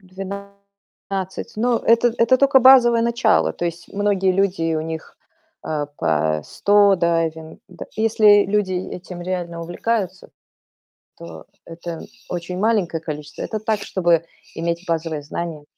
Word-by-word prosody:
12. 200 0 -8
Но 235 +1 +1
это 230 +1 +3
это 230 +3 +4
только 275 0 +4
базовое 240 -2 +6
начало. 235 -2 +2
То 175 - -5
есть 170 0 -5
многие 200 -2 +1
люди, 180 -4 0
у 155 - -1
них, 160 0 -7 0.5
э, 150 -2 -2
по 80 0 0
100 205 -1 +3
дайвин 165 -2 -1
д 180 - -9
если 215 -2 +5
люди 195 -2 0
этим 180 -1 -6
реально 175 -2 -4
увлекаются, 190 +2 -3 0.9
то 85 -1 -10 0.2
это 170 0 -7 0.3
очень 180 +1 -5
маленькое 195 -6 0
количество. 150 -2 -7
Это 215 - -4
так, 215 -1 -1
чтобы 175 -4 +1 0.3
иметь 170 +1 -3
базовые 160 -2 -2
знания. 155 0 -6
185 Hz, 130 wpm, -21 LUFS, 165-205 Hz, 0.9 s, базовое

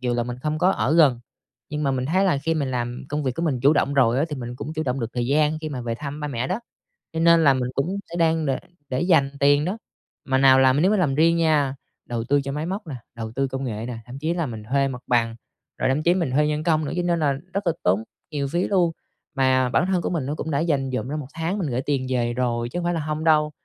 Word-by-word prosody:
dù 125 -1 -1
là 120 - +1
mình 120 +1 -5
không 155 0 -1
có 185 - +4
ở 155 - +1
gần. 140 -8 +5 0.5
Nhưng 150 0 -3
mà 140 - +1
mình 130 -1 -1
thấy 185 +5 +2
là 175 -7 +2
khi 165 +3 -1
mình 140 -4 -1
làm 120 -1 -3
công 150 +1 -2
việc 130 -3 -1
của 165 - -2
mình 140 -7 0
chủ 140 +4 +5
động 140 -2 +1
rồi 130 -2 +3
á, 150 - +2
thì 150 - -4
mình 120 -1 -6
cũng 155 - -6
chủ 155 - -1
động 135 -2 -2
được 115 -1 -3
thời 120 -1 -1
gian 150 +3 +2
khi 155 - -4
mà 130 -4 -5
về 115 -1 -3
thăm 145 +3 -6
ba 150 - -3
mẹ 125 -1 -2
đó. 185 +5 -1 0.5
Cho 160 - -2
nên 170 0 +5
là 140 -2 +6
mình 125 -1 -1
cũng 175 +8 -1
sẽ 170 - -7
đang 160 -1 +2
đ 140 - -1 0.4
để 130 0 -1
dành 165 -6 +3
tiền 145 +2 +4
đó. 195 +5 -2 0.5
Mà 130 -1 +1
nào 135 -1 +6
làm 130 +2 +4
nếu 190 - +4
mà 215 - +3
làm 145 -8 +1
riêng 165 +2 +4
nha, 150 -5 +2 0.3
đầu 120 -2 -3
tư 140 +4 +2
cho 140 0 -4
máy 150 +3 -3
móc 190 +1 -4
nè, 140 - -5 0.2
đầu 110 -1 -5
tư 135 +3 -1
công 135 +1 -4
nghệ 110 -3 -4
nè, 120 -1 -5
thậm 125 +2 -9
chí 160 +3 -1
là 170 -2 -1
mình 110 -5 -6
thuê 135 +5 +1
mặt 125 -2 -6
bằng 115 -2 +1 0.4
rồi - - +1
thậm 145 +4 +1
chí 175 - +4
mình 170 -8 -1
thuê 150 +3 +3
nhân 150 0 -1
công 155 -1 +2
nữa, - - -3
cho 180 - 0
nên 175 -1 +1
là 145 -3 +2 0.2
rất 200 -1 -2
là 170 - +3
tốn 95 +5 +2 0.3
nhiều 140 -2 -2
phí 170 +6 0
luôn. 180 -4 +2 0.4
Mà 130 -1 +3
bản 150 - +2
thân 185 -2 +1
của - - -2
mình 165 -7 -2
nó 145 +3 -2
cũng 160 +1 -4
đã 140 - +1
dành 145 -5 0
dụm 125 - -2
ra 145 - -3
1 150 - -4
tháng 165 +4 -2
mình 160 - -1
gửi 125 +1 -1
tiền 135 -2 -1
về 120 -2 0
rồi 120 -1 -1
chứ 175 - -3
hông 175 - -4
phải 175 - +1
là 165 - -1
hông 155 +1 -3
đâu. 150 -2 +3
145 Hz, 295 wpm, -23 LUFS, 130-160 Hz, 0.5 s, là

